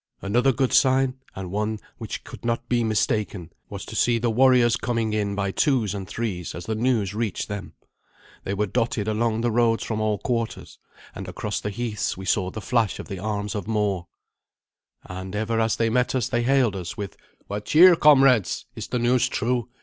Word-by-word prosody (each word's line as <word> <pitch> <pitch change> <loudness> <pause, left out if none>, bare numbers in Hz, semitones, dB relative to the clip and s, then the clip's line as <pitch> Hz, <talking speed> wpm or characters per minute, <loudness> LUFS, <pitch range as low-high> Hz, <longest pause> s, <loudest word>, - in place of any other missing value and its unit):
Another 120 +7 +3
good 130 0 0
sign, 130 -1 +3 0.2
and 95 - -5
that - - -7
one 105 +3 -1 0.2
which - - -6
could - - -11
not 115 0 -2
be 120 -1 +1
mistaken, 105 -5 -1 0.2
was - - -7
to - - -9
see 120 -1 +3
the 115 0 0
warriors 125 -1 +5
coming 115 -2 -1
in 100 -1 -1
by 100 -1 -1
twos 120 - +1
and 95 -2 -5
threes 95 -7 -4
as 85 - -7
the 110 - -2
news 110 -4 0
reached 110 -3 -2
them. 100 -1 -6 0.7
They 100 - -2
were 105 +1 +1
dotted 115 -1 -1
along 110 +1 0
the 120 0 +1
roads 115 0 +2
from 110 -1 -3
all 105 -1 +1
quarters, 115 0 -3 0.3
and - - -7
across - - -4
the 105 - -3
heaths 105 -1 -3
we 95 - -7
saw 95 0 +1
the 110 +3 -7
flash 115 0 +1
of - - -9
the 95 -2 -5
arms 105 0 -3
of 105 -2 -4
more. 105 -5 -1 1.0
And 95 +2 -7
ever 110 +2 -1
as 115 -1 +2
they 115 -1 +1
met 125 +2 +1
us 125 -4 0
they 120 -1 +1
hailed 125 -4 +2
us 90 -2 -6
with, 100 -1 -5 0.3
"What 105 +1 -5
cheer, 170 +8 +7
comrades? 135 - +4
Is - - -6
the - - -2
news 120 +1 +2
true? 120 +1 -1
110 Hz, 200 wpm, -24 LUFS, 100-120 Hz, 1.0 s, cheer